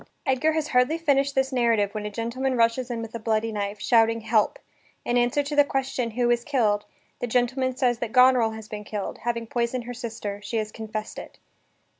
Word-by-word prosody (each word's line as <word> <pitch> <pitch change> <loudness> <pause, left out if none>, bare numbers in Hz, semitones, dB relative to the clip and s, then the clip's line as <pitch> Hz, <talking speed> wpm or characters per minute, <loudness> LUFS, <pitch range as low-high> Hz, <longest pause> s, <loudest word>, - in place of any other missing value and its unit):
Edgar 270 +3 +2
has 315 -1 -1
hardly 250 +5 +3
finished 280 -4 +1
this 265 0 +1
narrative 230 -5 +2
when 210 -1 -4
a - - -4
gentleman 240 +4 -2
rushes 230 +2 +2
in 230 -2 -3
with 225 - -8
a 230 - -4
bloody 220 0 0
knife, 205 -1 -3
shouting 225 +2 +3
"Help!" 220 -1 +1 0.5
In 240 - 0
answer 245 +4 +2
to 290 +1 -4
the 290 - +7
question, 265 -3 -2
"Who 240 +1 +1
is 240 0 +1
killed?" 220 -8 +1 0.3
the 245 - -2
gentleman 255 +2 0
says 245 -2 +1
that 235 -2 -3
Goneril 250 -2 +5
has 220 -1 -8
been 210 -1 -7
killed, 205 -1 -5
having 235 0 -2
poisoned 240 +2 -2
her 245 +1 -6
sister, 220 -4 -6
she 210 +3 -3
has 215 -1 -2
confessed 215 -1 -6
it. - - -11
235 Hz, 205 wpm, -25 LUFS, 220-255 Hz, 0.5 s, the